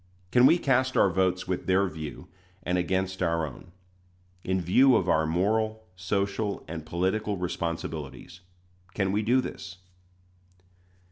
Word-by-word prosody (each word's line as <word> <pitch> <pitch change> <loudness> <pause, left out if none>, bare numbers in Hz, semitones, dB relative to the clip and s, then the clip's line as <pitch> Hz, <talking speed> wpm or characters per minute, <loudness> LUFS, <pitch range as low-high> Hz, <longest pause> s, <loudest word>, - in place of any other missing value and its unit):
Can 125 +1 +6
we 170 - +5
cast 130 -4 +1
our 95 - +4
votes 95 0 0
with 90 -1 -3
their 95 +1 +3
view, 80 -3 -8 0.4
and 90 0 0
against 95 +1 -1
our 85 -2 +1
own? 80 +5 -11 0.7
In 95 0 0
view 125 +10 +5
of 90 - +1
our 80 -2 +2
moral, 110 +6 0
social, 100 +3 -2
and 80 -1 -6
political 100 +4 -1
responsibilities, 85 -2 -5 0.6
can 95 -2 0
we 105 +2 +1
do 120 +4 +3
this? 90 -7 -8
95 Hz, 135 wpm, -27 LUFS, 85-105 Hz, 0.7 s, Can